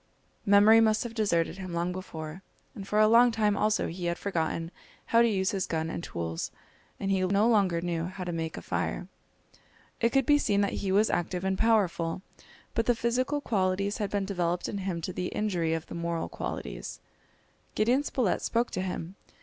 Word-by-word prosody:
Memory 205 +3 +7
must 220 -1 +3
have 240 -2 -6
deserted 190 -5 0
him 185 -2 -6
long 170 +1 0
before, 170 -2 -7 0.3
and 195 -1 -8
for 210 - -1
a 215 - +6
long 235 +2 +6
time 210 -2 +1
also 215 +1 +1
he 175 +1 -5
had 170 0 -1
forgotten 165 -3 -2 0.3
how 230 - +4
to 235 - +5
use 190 -4 +1
his 195 -2 -2
gun 160 0 -2
and 170 - -5
tools, 80 -1 -4 0.5
and 195 0 -1
he 190 -1 +2
no 200 +4 +3
longer 195 -7 +3
knew 170 -1 -2
how 185 +1 -6
to 175 - -3
make 165 -1 -3
a - - -7
fire! - - -2 0.9
It 230 - +3
could 270 +1 +2
be 290 +2 +5
seen 200 -7 +2
that 200 - 0
he 195 - -1
was 210 +3 +3
active 180 +1 -1
and 190 0 +1
powerful, 190 -5 +1 0.5
but 230 - 0
the 245 - +4
physical 255 +5 0
qualities 200 -3 0
had 205 -2 -1
been 200 -1 -1
developed 180 -3 -1
in 200 - -4
him 185 -3 -3
to 180 +3 -4
the 180 0 -2
injury 175 -6 -1
of 160 - -5
the - - -10
moral 170 -1 -2
qualities. - - -6 0.8
Gideon 240 +6 +3
Spilett 255 -8 0
spoke 235 +1 0
to 185 - -2
him. 185 0 -5
190 Hz, 200 wpm, -28 LUFS, 170-215 Hz, 0.9 s, Memory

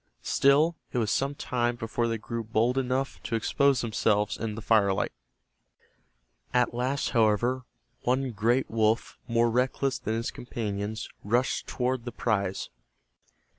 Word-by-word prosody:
Still, 150 +5 +4
it - - -3
was 110 -3 +1
some 140 +1 0
time 120 -3 -1
before 115 0 -1
they 115 0 -1
grew 115 +1 -4
hold 115 +3 +2
enough 130 +1 -1
to 115 - -3
expose 135 +3 +2
themselves 105 -2 +1
in 110 -1 -4
the 115 - -6
firelight. 100 -4 +3 1.4
At 125 -1 +3
last, 130 +4 -1
however, 120 +2 +2 0.4
one 130 +1 0
great 120 +5 +1
wolf 110 0 +1
more 115 0 +2
reckless 130 +2 0
than 110 - -2
its 115 - -2
companions 110 -2 -4 0.2
rushed 120 +6 0
toward 125 -1 -1
the 120 - -4
prize. 100 -4 -1
120 Hz, 135 wpm, -28 LUFS, 110-130 Hz, 1.4 s, Still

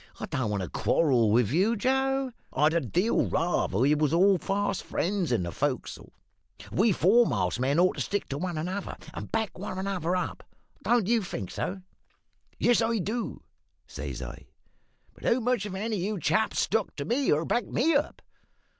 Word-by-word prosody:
I - - -3
don't 125 -5 -2
want 100 -2 -1
to 90 - -5
quarrel 125 -9 +2
with 115 +1 +3
you, 195 +9 +2
Joe; 265 +3 0 0.2
I'd 150 +2 +3
a 170 - +2
deal 180 - +1
rather 165 - 0
we 135 +6 +4
was 150 +1 +2
all 190 +1 +5
fast 200 +1 -1
friends 185 -4 -1
in 110 -7 +1
the 85 - -4
fo'c's'le. 135 - -3 0.6
We 210 - +3
foremast 170 - +3
men 135 +4 +1
ought 180 +1 +3
to - - -2
stick 205 - -2
to 140 - -3
one 175 -1 -3
another, 185 +5 -4 0.2
and - - -7
back 220 -4 -2
one 185 -1 -5
another 190 -2 -1
up; 180 - -3 0.4
don't 240 -4 +2
you 230 +2 +2
think 105 - -5
so?' 190 0 -4 0.8
"`Yes, 240 -1 +4
I 230 0 +1
do,' 220 +5 -3 0.4
says - - -6
I; - - -9 0.7
`but - - -2
how 235 - +3
much 245 -3 0
have 195 -2 -5
any 215 +2 -2
of - - -3
you 205 +1 -2
chaps 160 +8 +1
stuck 220 -2 0
to 140 -1 -4
me, 265 +3 +1
or 155 +2 +2
backed 240 +2 -1
me 310 +8 +2
up? 285 +1 -1
185 Hz, 185 wpm, -28 LUFS, 150-225 Hz, 0.8 s, all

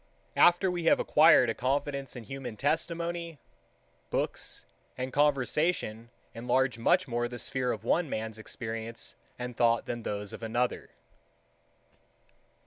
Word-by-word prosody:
9. - - +5
After 175 +2 +2
we 175 -2 -3
have - - +5
acquired 150 -5 +6
a 115 - 0
confidence 140 +2 -2
in 120 - -7
human 125 -1 -7
testimony, 170 +3 -1 0.7
books - - -2 0.3
and 130 0 -4
conversation 140 -4 +1 0.2
enlarge 125 +1 0
much 180 +10 +3
more 120 -1 -1
the 120 0 -7
sphere 125 +1 -1
of - - -5
one 170 -3 +1
man's 110 -1 -4
experience 115 +1 -6 0.2
and 125 -1 -5
thought 115 -1 +3
than 120 -1 -4
those 105 -2 -4
of - - -8
another. 120 +2 -1
125 Hz, 135 wpm, -29 LUFS, 115-150 Hz, 0.7 s, acquired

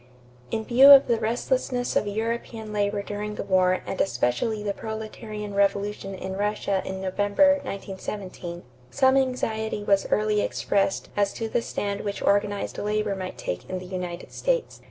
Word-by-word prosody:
= 125 0 -27
In 220 -1 -2
view 260 +3 +7
of 280 -1 +10
the 235 -2 +1
restlessness 245 +2 -1
of 210 - +2
European 220 +1 -3
labor 205 0 0
during 210 +1 -4
the - - -4
war 185 -1 +2
and 190 - -2
especially 195 - 0
the 205 -1 -1
proletarian 215 -1 -6
revolution 200 0 0
in 190 0 -5
Russia 200 -1 0
in 190 0 -5
November, 205 +10 +3
1917, 190 -5 -6 0.3
some 260 - +3
anxiety 220 -5 0
was 200 -1 +2
early 210 0 +2
expressed 195 -1 0
as 205 -1 +2
to 225 - -3
the 230 - 0
stand 200 -2 -3
which 200 -1 -4
organized 205 0 +1
labor 210 -1 0
might 185 -1 -6
take 90 - -5
in 185 - -2
the 185 - -7
United 180 -1 -5
States. - - -1
205 Hz, 160 wpm, -25 LUFS, 195-220 Hz, 0.3 s, of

